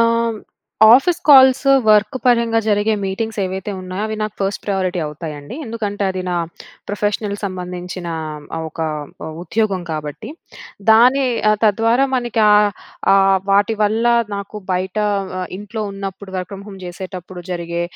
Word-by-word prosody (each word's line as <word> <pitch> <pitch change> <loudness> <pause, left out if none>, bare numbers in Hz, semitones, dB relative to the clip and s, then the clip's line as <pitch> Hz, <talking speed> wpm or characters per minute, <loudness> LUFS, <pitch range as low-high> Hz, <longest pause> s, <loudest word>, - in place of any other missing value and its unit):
ఆహ్, 230 -1 +2 0.6
office 330 +7 +3
calls 265 -2 +7 0.2
work 210 +2 +4
పరంగా 235 -2 +3
జరిగే 210 +1 +2
మీటింగ్స్ 220 +3 -3
ఏవైతే 190 +2 -3
ఉన్నాయో 185 +2 -5
అవి 220 - -3
నాకు 215 0 -3
ఫస్ట్ 195 0 -1
ప్రయారిటీ 185 -3 -1
అవుతాయండి. 150 - -7
ఎందుకంటే, 215 -3 -4
అది 185 0 -4
నా 175 - -1 0.5
ప్రొఫెషనల్ 205 0 -1
సంబంధించిన 180 -2 -5 0.5
ఆహ్, 160 - -4
ఒక 160 - -9 0.6
ఉద్యోగం 200 -1 -1
కాబట్టి. 155 +7 -5 0.6
దాని 250 +5 +6 0.4
తద్వారా 230 +5 +3
మనకి 240 -2 0
ఆహ్, 210 0 +5 0.4
ఆహ్, 195 0 +5
వాటి 200 +3 +3
వల్ల 220 +3 +1 0.3
నాకు 200 +1 -7 0.2
బయట 185 +1 -2 0.6
ఇంట్లో 210 +2 -5
ఉన్నప్పుడు 195 0 -7
వర్క్ 180 +1 -4
ఫ్రమ్ 195 0 -8
హోమ్ 195 -1 -10
చేసేటప్పుడు 180 0 -8
జరిగే 170 -1 -3
200 Hz, 130 wpm, -19 LUFS, 185-225 Hz, 0.6 s, calls